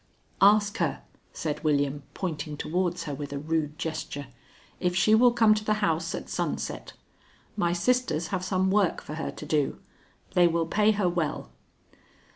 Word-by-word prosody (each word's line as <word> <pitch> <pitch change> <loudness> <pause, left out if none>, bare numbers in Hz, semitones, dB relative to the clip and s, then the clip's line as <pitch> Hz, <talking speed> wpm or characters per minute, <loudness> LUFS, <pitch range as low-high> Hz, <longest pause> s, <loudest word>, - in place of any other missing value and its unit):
"Ask 205 +1 +5
her," - - -1 0.3
said 150 -2 -4
William, 145 -2 +1
pointing 155 -5 -4
towards 180 +2 -1
her 150 - -4
with 145 0 -6
a 140 - -3
rude 155 0 -2
gesture, 155 -3 -4 0.5
"if 180 -1 0
she 200 +4 +4
will 240 +2 +6
come 225 -2 +5
to 215 0 -2
the 215 0 +1
house 170 -6 0
at - - -6
sunset. - - -3 0.6
My 175 -5 +1
sisters 175 -2 0
have 185 -2 -2
some 190 0 +1
work 200 -3 +2
for 150 - -8
her 160 +1 -3
to - - -8
do. 150 -2 0 0.6
They 175 -1 +5
will 165 0 +1
pay 210 +6 +2
her 200 -3 +1
well." 170 -4 -2
175 Hz, 165 wpm, -27 LUFS, 155-205 Hz, 0.6 s, will